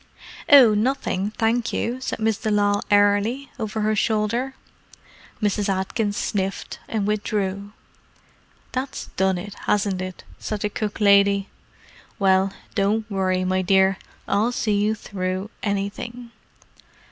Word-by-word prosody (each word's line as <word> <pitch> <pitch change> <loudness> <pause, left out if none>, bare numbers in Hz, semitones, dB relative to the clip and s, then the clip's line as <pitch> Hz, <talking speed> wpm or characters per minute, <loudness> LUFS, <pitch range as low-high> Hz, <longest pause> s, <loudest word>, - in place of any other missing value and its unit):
"Oh—nothing, 230 -5 +4
thank 230 +1 +1
you," 245 +3 -2
said - - -3
Miss 220 -1 0
de 220 - -2
Lisle 205 -1 +2
airily, 205 +6 +2
over 220 -1 -3
her 215 +1 +1
shoulder. 225 +5 0 0.9
Mrs. 205 0 +1
Atkins 205 +2 -1
sniffed, 195 -1 -3
and 215 -3 -1
withdrew. 205 -1 -2 1.0
"That's 260 +1 -4
done 190 -1 +2
it, 200 +3 -7
hasn't 200 -3 +1
it?" 185 -1 -6 0.2
said 215 -2 -4
the 210 - 0
cook 210 +1 -3
lady. 200 -1 +4 0.7
"Well, 190 0 +3 0.2
don't 215 +2 +1
worry, 185 -1 0
my 185 0 +1
dear; 190 0 +3 0.3
I'll 215 +4 +2
see 220 -3 0
you 215 +1 +1
through 185 0 -4
anything." 210 +4 -4
205 Hz, 125 wpm, -23 LUFS, 195-220 Hz, 1.0 s, Oh—nothing